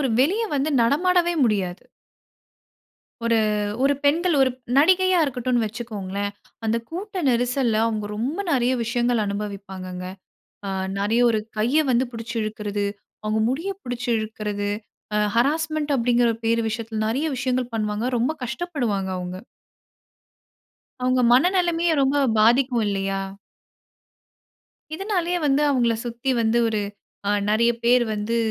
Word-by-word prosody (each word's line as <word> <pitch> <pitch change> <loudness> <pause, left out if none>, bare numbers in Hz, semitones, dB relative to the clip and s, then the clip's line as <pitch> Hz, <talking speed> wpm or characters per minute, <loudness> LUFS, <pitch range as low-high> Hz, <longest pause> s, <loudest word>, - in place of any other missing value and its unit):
ஒரு 270 - +1
வெளிய 375 - +2
வந்து 285 +2 0
நடமாடவே 345 +8 +3
முடியாது. 195 -6 -1 1.4
ஒரு 230 0 +3 0.5
ஒரு 280 +1 +4
பெண்கள் 330 +4 +3
ஒரு 265 -1 +4 0.3
நடிகையா 370 +5 +5
இருக்கட்டுன்னு 250 -3 0
வச்சிக்கோங்களேன். 205 -3 -4 0.3
அந்த 220 +1 +1
கூட்ட 375 +2 -4
நெரிசல்ல, 245 -1 +1
அவுங்க 215 -2 -1
ரொம்ப 260 - -2
நெறைய 255 -3 +2
விஷயங்கள் 240 -1 +1
அனுபவிப்பாங்கங்க. 195 -3 -5 0.6
ஆ - - -3 0.3
நெறைய 210 +4 +1
ஒரு 220 - +1 0.2
கைய 240 +8 +2
வந்து 250 +1 +3
பிடிச்சு 230 +1 -6
இழுக்குறது, 210 -1 -3 0.4
அவுங்க 215 +1 0
முடிய 320 +10 -2
பிடிச்சு 245 0 -5
இழுக்குறது, 210 -2 -3 0.4
ஆ - - +2 0.2
ஹராஸ்மன்ட் 305 +3 +1
அப்படிங்கிற 240 -1 +3 0.2
பேரு 230 +1 +2
விஷயத்தில 220 0 -4
நெறைய 270 +8 0
விஷயங்கள் 250 -1 -1
பண்ணுவாங்க. 215 +1 -1
ரொம்ப 245 +6 +1
கஷ்டப்படுவாங்க 245 - -2
அவுங்க. 180 0 -5 1.7
அவுங்க 255 0 +2
மனநிலமையும் 345 +2 +3
ரொம்ப 275 +2 +2 0.2
பாதிக்கும் 240 +1 +4
இல்லையா? 195 -1 -1 1.7
இதனாலயே 360 -1 -1
வந்து, 285 +1 +3
அவங்கள 240 -4 +2
சுத்தி 240 +3 -2
வந்து 225 +1 +2
ஒரு 215 -2 -1 0.5
ஆ - - +3 0.2
நறைய 235 +2 +3
பேர் 245 +1 +5
வந்து, 210 +3 -2
240 Hz, 120 wpm, -23 LUFS, 215-285 Hz, 1.7 s, நடிகையா